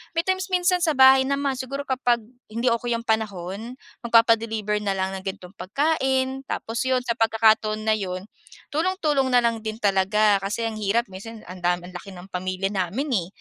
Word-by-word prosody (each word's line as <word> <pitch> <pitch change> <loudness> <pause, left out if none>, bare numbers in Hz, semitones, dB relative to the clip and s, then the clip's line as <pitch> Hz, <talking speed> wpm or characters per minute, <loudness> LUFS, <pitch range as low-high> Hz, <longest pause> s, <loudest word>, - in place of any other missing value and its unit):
may 330 - +2
times 375 +1 -1
minsan 360 -1 +2
sa 320 -3 +1
bahay 265 0 +7
naman 280 0 0
siguro 275 +2 -4
kapag 250 -4 0 0.2
hindi 235 +3 0
okey 235 0 0
yung 230 - -4
panahon 220 0 -3 0.3
magpapa-deliver 225 -2 +3
na 200 -2 -1
lang 190 0 -1
ng 190 - -16
gan'tong 190 0 -7
pagkain, 265 +2 0
tapos 225 +1 -4
'yon 260 -1 +2
sa 235 -1 -2
pagkakataon 220 -1 +3
na 215 - +3
'yon, 185 0 -5 0.4
tulong-tulong 305 -5 0
na 245 - +6
lang 230 -2 0
din 220 +1 -4
talaga. 200 +1 +3
Kasi 205 +4 -2
ang 220 - -5
hirap 215 +3 0
minsan 215 +4 -9
ang 185 - -8
dami, 175 0 0
ang 185 - -15
laki 195 +2 -11
ng 180 0 -11
pamilya 185 +1 -2
namin 200 - -2
eh. 175 -5 -1
225 Hz, 185 wpm, -24 LUFS, 195-260 Hz, 0.4 s, bahay